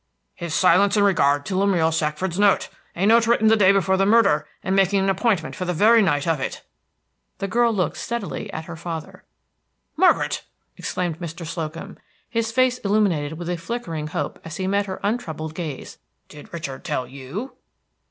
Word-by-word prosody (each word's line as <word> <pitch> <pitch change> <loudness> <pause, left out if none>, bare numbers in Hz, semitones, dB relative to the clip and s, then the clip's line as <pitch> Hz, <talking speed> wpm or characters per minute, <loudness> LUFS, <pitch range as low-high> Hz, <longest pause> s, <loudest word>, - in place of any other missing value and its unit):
"His 170 -3 -5
silence 195 +3 +4
in 205 - +4
regard 145 -7 +3
to 190 - -3
Lemuel 185 -4 +2
Shackford's 165 +3 -1
note, 205 -1 +3 0.3
a 185 - 0
note 230 +2 +5
written 220 -2 +4
the 225 - +6
day 200 -3 +5
before 190 -1 +2
the 195 - +3
murder, 220 -9 +4 0.2
and 190 +1 0
making 195 0 +3
an 195 - +2
appointment 195 -3 0
for 185 - -4
the 180 -1 -2
very 225 +6 +6
night 145 -7 +1
of 165 -3 +1
it." 130 - -4 0.7
The 195 - -3
girl 235 +3 +2
looked 190 -5 -1
steadily 235 -3 -4
at 160 -2 -6
her 170 - -7
father. 165 -1 -7 0.7
"Margaret!" 365 +3 +3 0.3
exclaimed 175 -3 -3
Mr. 170 0 -6
Slocum, 165 0 -6 0.3
his 230 -2 -1
face 255 +1 +2
illuminated 195 -8 +1
with 175 0 -6
a 175 0 -1
flickering 165 -5 -4
hope 145 -1 -4
as 160 -1 -7
he 190 - -2
met 200 +1 0
her 190 - -5
untroubled 160 -8 -3
gaze, 155 -5 -6 0.3
"did 150 - -13
Richard 155 -6 -6
tell 130 - -2
_you?" 140 - -7
185 Hz, 180 wpm, -23 LUFS, 160-205 Hz, 0.7 s, the